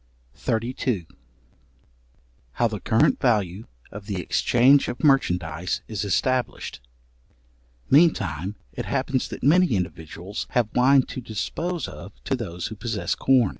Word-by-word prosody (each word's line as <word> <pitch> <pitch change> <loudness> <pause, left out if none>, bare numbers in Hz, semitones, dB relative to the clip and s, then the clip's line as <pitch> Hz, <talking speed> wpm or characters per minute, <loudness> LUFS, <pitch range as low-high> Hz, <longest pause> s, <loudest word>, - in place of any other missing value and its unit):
§32. 115 -5 -2 1.5
How 120 - +2
the 105 -2 -5
current 110 +5 +2
value 105 -5 0 0.2
of 100 0 -9
the 100 -4 -3
exchange 125 - +4
of 120 - -5
merchandize 90 - +1
is 105 -3 -3
established. 125 - -1 1.1
Meantime 105 - +3 0.2
it - - -5
happens 130 -1 -1
that - - -8
many 160 - +4
individuals 85 +2 -5
have 115 -3 +1
wine 130 +2 +5
to 130 - -7
dispose 160 - -3
of - - -10
to - - 0
those 90 -8 -5
who 110 - -5
possess 110 0 -2
corn. 125 -6 +3
110 Hz, 125 wpm, -24 LUFS, 95-130 Hz, 1.5 s, wine